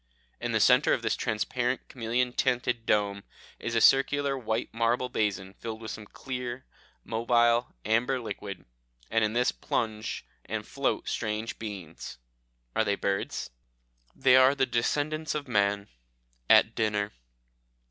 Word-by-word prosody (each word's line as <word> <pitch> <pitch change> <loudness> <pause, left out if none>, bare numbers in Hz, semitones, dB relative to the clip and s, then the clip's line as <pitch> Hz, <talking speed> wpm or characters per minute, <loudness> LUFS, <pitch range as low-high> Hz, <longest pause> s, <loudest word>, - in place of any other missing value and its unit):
In - - -2
the - - +2
centre - - +5
of - - -1
this - - +1
transparent 125 +4 -1
chameleon 125 +1 -1
tinted 125 -2 0
dome 100 -1 +1 0.4
is 115 - -3
a 115 - +3
circular 140 +2 +4
white 115 -2 -2
marble 115 +2 +1
basin 100 -4 -1
filled 110 +1 -6
with 110 -1 -6
some 105 -1 -8
clear, 125 0 -5 0.4
mobile, 120 +1 +2
amber 120 +5 +2
liquid, 100 -5 -6 0.5
and 115 0 +3
in 105 0 +1
this 125 +1 +2
plunge 110 -1 -3 0.2
and - - -4
float - - -1
strange 110 +1 -3
beings. 100 -7 -7 0.6
Are - - +3
they 100 -2 +1
birds? 100 0 -2 0.6
"They 130 -1 +5
are 130 +2 +6
the 135 -1 +2
descendants 145 +6 -1
of 150 -2 -3
man 100 -3 +1 0.6
at - - +6
dinner. 105 -1 0
115 Hz, 135 wpm, -28 LUFS, 105-125 Hz, 0.6 s, are